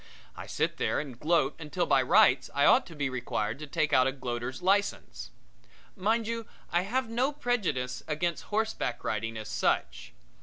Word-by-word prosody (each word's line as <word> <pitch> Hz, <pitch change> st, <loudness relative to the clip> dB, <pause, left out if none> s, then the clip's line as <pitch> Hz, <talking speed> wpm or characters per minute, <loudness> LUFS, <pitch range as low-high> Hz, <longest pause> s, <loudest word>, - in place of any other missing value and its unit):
I -, -, -8 dB
sit -, -, -1 dB
there -, -, 0 dB
and 135 Hz, -5 st, -7 dB
gloat 150 Hz, -3 st, +2 dB
until 165 Hz, +3 st, -2 dB
by 135 Hz, -2 st, +4 dB
rights 130 Hz, 0 st, +4 dB
I 140 Hz, -, +4 dB
ought -, -, +5 dB
to 165 Hz, -, -11 dB
be 145 Hz, -2 st, -1 dB
required 120 Hz, -2 st, -3 dB
to 150 Hz, -, -7 dB
take 150 Hz, +1 st, 0 dB
out 130 Hz, 0 st, +5 dB
a -, -, +1 dB
gloater's 130 Hz, +2 st, -5 dB
license. 190 Hz, -, 0 dB, 0.7 s
Mind 220 Hz, +4 st, +1 dB
you, 230 Hz, 0 st, -4 dB, 0.2 s
I 175 Hz, -, +3 dB
have 245 Hz, +6 st, -1 dB
no 245 Hz, +5 st, 0 dB
prejudice 190 Hz, -, -1 dB
against 165 Hz, +2 st, -2 dB
horseback 215 Hz, -, -2 dB
riding 115 Hz, +1 st, -2 dB
as 110 Hz, -1 st, -6 dB
such. 60 Hz, -, -1 dB
150 Hz, 175 wpm, -29 LUFS, 125-200 Hz, 0.7 s, ought